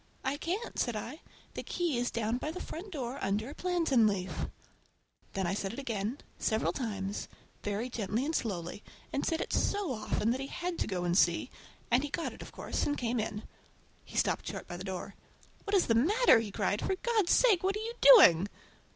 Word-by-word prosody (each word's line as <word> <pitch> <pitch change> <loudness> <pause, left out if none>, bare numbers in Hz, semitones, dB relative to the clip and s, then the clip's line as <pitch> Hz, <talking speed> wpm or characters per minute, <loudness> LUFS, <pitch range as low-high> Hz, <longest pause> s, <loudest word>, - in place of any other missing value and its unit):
"I 270 +2 -1
can't," 370 +10 -3
said 240 -3 0
I. 235 +8 -6 0.3
"The - - -4
key 345 -5 -1
is 245 - 0
down 230 +1 -1
by 300 - -3
the 345 +4 -5
front 370 +4 -7
door 265 -4 -4
under 205 +6 -1
a - - -8
plantain 325 -11 +2
leaf!" 190 -3 -1
And - - -2 0.8
then 190 -1 -1
I 175 - 0
said 195 0 -3
it - - -8
again, 230 -2 -2 0.2
several 220 0 +1
times, 205 -5 -3 0.3
very 205 +4 -2
gently 230 +1 -2
and 320 +2 -1
slowly, 190 -3 -3 0.3
and 280 - 0
said 325 +1 0
it - - -4
so 400 -9 +1
often 215 0 0
that 255 - -1
he 270 - -4
had 350 +2 -4
to - - 0
go 185 -3 -2
and 175 0 +1
see, - - +3 0.4
and 245 +2 +5
he 290 - -3
got 330 - -3
it, - - -12
of - - -9
course, - - -2
and 290 - 0
came 240 0 -1
in. 210 0 -3 0.6
He - - -9
stopped - - +1
short - - -5
by 175 - -6
the 180 - -7
door. 190 0 -5 0.5
"What 405 0 +1
is 380 - +4
the 230 - +2
matter?" 320 - +5
he 225 -2 -3
cried. 205 +1 -1
"For 380 - +1
God's 430 -3 +1
sake, 440 -8 +5
what 385 +1 +1
are 425 - -3
you 460 - -4
doing!" 200 - +9
245 Hz, 215 wpm, -31 LUFS, 205-335 Hz, 0.8 s, doing